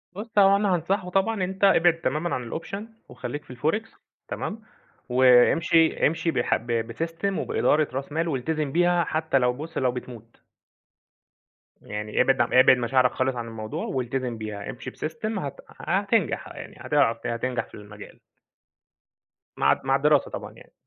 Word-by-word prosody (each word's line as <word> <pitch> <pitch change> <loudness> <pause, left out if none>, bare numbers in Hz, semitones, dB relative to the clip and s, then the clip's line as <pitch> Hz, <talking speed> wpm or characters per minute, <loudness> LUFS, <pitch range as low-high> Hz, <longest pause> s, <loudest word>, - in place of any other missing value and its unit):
بُص، 215 +2 -2
هو 195 0 +6
أنا 200 -2 +2
هانصحه 180 +2 -2
طبعًا 195 +2 0
أنت 190 +2 -4
ابعد 175 -4 +4
تمامًا 160 +3 -1
عن 120 -2 -5
الoption 185 +5 -5 0.3
وخلّيك 145 0 -6
في - - -11
الforex 210 - -2 0.3
تمام؟ 220 +1 -5 0.5
وامشي 130 +6 +4
امشي 165 +2 -1
بح - - +1
ب 115 0 -2
بsystem، 165 - -3
وبإدارة 155 0 +1
راس 135 +2 -4
مال، 165 +2 -1
والتزم 150 +1 -2
بيها 175 +2 +3
حتّى 155 -2 0
لو 125 -1 +2
بُص، 150 +6 -8
لو 130 -2 +2
بتموت. 120 -2 -10 1.4
يعني 105 +1 -2
ابعد 135 0 +3
عن 120 - 0
ابعد 130 0 +7
مشاعرك 125 +1 +2
خالص 130 0 -1
عن 120 -1 -5
الموضوع، 110 -1 -5
والتزم 125 -2 -3
بيها. 105 -2 -6
امشي 125 - -7
بsystem 215 +6 -4
هت 140 -5 -5 0.2
هتنجح. - - 0
يعني - - -10
هتع 115 - +2
هتنجح 115 0 -2
في - - -26
المجال. 105 0 -12 1.4
مع 70 +1 +4
الد - - 0
مع 135 - +3
الدراسة 145 +1 +2
طبعًا - - -7
يعني. - - -18
140 Hz, 155 wpm, -25 LUFS, 125-170 Hz, 1.4 s, ابعد